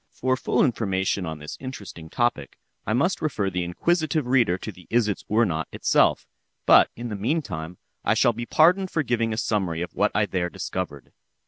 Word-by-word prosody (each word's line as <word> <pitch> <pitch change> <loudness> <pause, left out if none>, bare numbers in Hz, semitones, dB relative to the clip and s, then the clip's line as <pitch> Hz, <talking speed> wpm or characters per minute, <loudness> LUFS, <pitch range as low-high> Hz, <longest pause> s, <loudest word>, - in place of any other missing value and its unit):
For 130 +1 0
full - - +1
information 95 -6 -1
on 80 -1 -4
this 75 0 -8
interesting 100 -11 -8
topic, 120 +5 -1 0.3
I 110 - +1
must 165 - +1
refer 105 -11 -1
the 90 -1 -1
inquisitive 155 - 0
reader 120 -8 +3
to 110 - -6
the 90 -2 -17
"Isitsöornot" 105 -6 +1
itself; - - +2 0.4
but - - +7
in 120 +1 -6
the 105 - -4
meantime, 100 - -3 0.3
I - - +2
shall 120 - +3
be 120 +1 -6
pardoned 180 +4 +4
for 160 - 0
giving 115 -3 0
a 110 - -3
summary 95 -7 -1
of 90 - -7
what - - +1
I - - +3
there 90 -1 -2
discovered. 85 -4 -5
110 Hz, 180 wpm, -24 LUFS, 90-130 Hz, 0.4 s, but